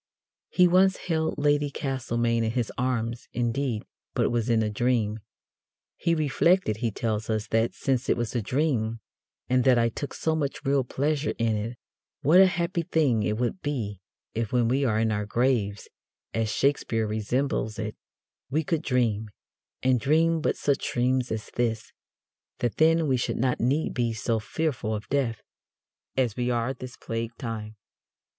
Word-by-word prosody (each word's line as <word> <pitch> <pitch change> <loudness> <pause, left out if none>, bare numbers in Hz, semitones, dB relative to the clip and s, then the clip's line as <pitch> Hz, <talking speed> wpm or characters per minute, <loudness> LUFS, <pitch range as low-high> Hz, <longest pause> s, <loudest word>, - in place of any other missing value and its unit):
He 180 -1 +5
once 185 +2 +4
held 160 -2 -1
Lady 145 0 +2
Castlemaine 120 -4 -1
in 110 - +1
his 120 -3 -1
arms, 120 -2 -2
indeed, 120 -1 -1 0.3
but - - +2
it - - +2
was 120 0 0
in 115 -1 +3
a 105 - 0
dream. 110 -1 +1 0.8
He 170 - +1
reflected, 155 - +2
he 115 0 0
tells 110 0 -2
us, 110 -1 0
that 115 +1 +1
since 135 -1 -1
it - - +3
was 120 -2 -2
a 120 - +1
dream, 115 -3 0 0.5
and 125 0 +3
that 130 -1 +5
I 115 0 +3
took 140 +4 -6
so 160 0 0
much 145 -1 -3
real 135 -1 +3
pleasure 145 +4 -1
in 115 -1 +1
it, 115 +3 -4 0.5
what 160 +7 +6
a 190 - +8
happy 175 -2 -1
thing 145 -8 +2
it 105 0 0
would 125 +10 -1
be 110 - -3 0.3
if 115 -1 -2
when 120 -2 +3
we 135 +4 +2
are 110 -4 +2
in 110 0 +2
our 105 -1 -1
graves 115 -4 0 0.5
(as 115 -1 0
Shakespeare 120 -5 +1
resembles 110 +1 -1
it) 110 -1 -4 0.5
we 155 +5 +1
could 160 +1 0
dream, 115 -7 0 0.5
and 130 -1 +3
dream 160 +5 +3
but - - 0
such 140 -1 0
dreams 125 +1 +1
as 110 -1 -4
this, 115 -2 -1 0.7
that 120 -2 -2
then 165 +1 +4
we 130 -2 +2
should 120 - -1
not 125 0 +1
need 135 +7 +1
to - - -7
be 115 -1 +1
so 115 0 0
fearful 110 -2 -2
of 105 - -6
death, 130 -6 0 0.7
as 120 -5 +1
we 125 0 -1
are 120 +1 0
this 130 -1 -9
plague 115 0 -4
time. 110 -4 -5
120 Hz, 175 wpm, -27 LUFS, 110-140 Hz, 0.8 s, a